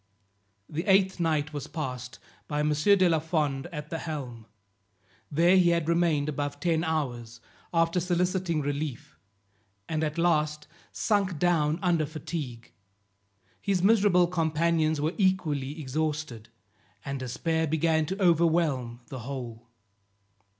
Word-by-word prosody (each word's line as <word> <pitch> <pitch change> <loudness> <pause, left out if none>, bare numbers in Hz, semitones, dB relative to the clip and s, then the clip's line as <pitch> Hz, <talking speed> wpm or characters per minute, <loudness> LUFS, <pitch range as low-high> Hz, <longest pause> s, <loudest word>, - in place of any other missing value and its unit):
The 160 +3 -3
eighth 190 -1 +3
night 155 -2 0
was 145 -2 -5
passed 130 -5 -5 0.3
by 150 -1 -1
M. 150 - +1
de 185 +5 +4
la 165 -2 +3
Fond 150 -3 -1
at 150 -4 -8
the 165 - -2
helm; 125 -9 -6 0.8
there 170 +5 +4
he 180 -2 +5
had 170 -2 +1
remained 165 -4 +2
above 145 -1 -3
ten 165 +1 +1
hours, 125 -8 -3 0.3
after 165 +1 +2
soliciting 180 -1 0
relief, 145 -2 -4 0.7
and 155 -1 -1
at 155 0 -2
last 150 -3 +1 0.3
sunk 200 -5 0
down 160 -2 +2
under 170 -4 +2
fatigue. 145 -6 -6 0.9
His 190 -3 0
miserable 200 -4 +5
companions 160 -2 +1
were 155 +4 0
equally 155 -7 0
exhausted, 150 -4 -3 0.6
and 140 0 -3
despair 160 +6 -1
began 160 0 +1
to 190 +5 -4
overwhelm 160 -9 +2
the 130 - -6
whole. 120 -2 -7
155 Hz, 125 wpm, -28 LUFS, 145-170 Hz, 0.9 s, he